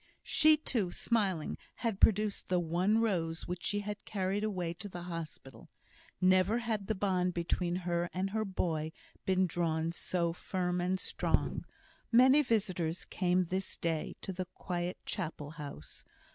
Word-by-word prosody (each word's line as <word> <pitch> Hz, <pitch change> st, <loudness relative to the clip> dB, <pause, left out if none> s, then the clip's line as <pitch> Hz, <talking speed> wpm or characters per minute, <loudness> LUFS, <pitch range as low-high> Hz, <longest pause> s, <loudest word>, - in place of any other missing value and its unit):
She 310 Hz, 0 st, +6 dB
too, 220 Hz, -, 0 dB
smiling, 195 Hz, -7 st, 0 dB, 0.2 s
had 225 Hz, -5 st, -2 dB
produced 210 Hz, -1 st, +3 dB
the 180 Hz, -1 st, +3 dB
one 175 Hz, +6 st, +2 dB
rose 170 Hz, -7 st, 0 dB
which 180 Hz, 0 st, -4 dB
she 205 Hz, 0 st, 0 dB
had 205 Hz, 0 st, -5 dB
carried 195 Hz, 0 st, -1 dB
away 180 Hz, -6 st, -1 dB
to 200 Hz, +4 st, -8 dB
the 175 Hz, -2 st, -7 dB
hospital. 165 Hz, -6 st, -7 dB, 0.5 s
Never 185 Hz, +4 st, +4 dB
had 220 Hz, -4 st, -2 dB
the 220 Hz, -, 0 dB
bond 185 Hz, -2 st, +1 dB
between 175 Hz, +1 st, 0 dB
her 175 Hz, -1 st, -1 dB
and 190 Hz, +1 st, -2 dB
her 220 Hz, +1 st, 0 dB
boy 165 Hz, -5 st, -1 dB, 0.3 s
been 190 Hz, 0 st, +4 dB
drawn 165 Hz, -2 st, 0 dB
so 170 Hz, -1 st, 0 dB
firm 180 Hz, 0 st, -1 dB
and 185 Hz, +1 st, 0 dB
strong. -, -, 0 dB, 0.5 s
Many 260 Hz, +5 st, +7 dB
visitors 185 Hz, -, 0 dB
came 180 Hz, -1 st, +1 dB
this 185 Hz, +2 st, -3 dB
day 165 Hz, -2 st, -2 dB
to 190 Hz, -, -4 dB
the 185 Hz, 0 st, -3 dB
quiet 175 Hz, 0 st, -3 dB
Chapel 155 Hz, -5 st, -4 dB
house. 145 Hz, -, -9 dB
185 Hz, 150 wpm, -33 LUFS, 170-205 Hz, 0.5 s, Many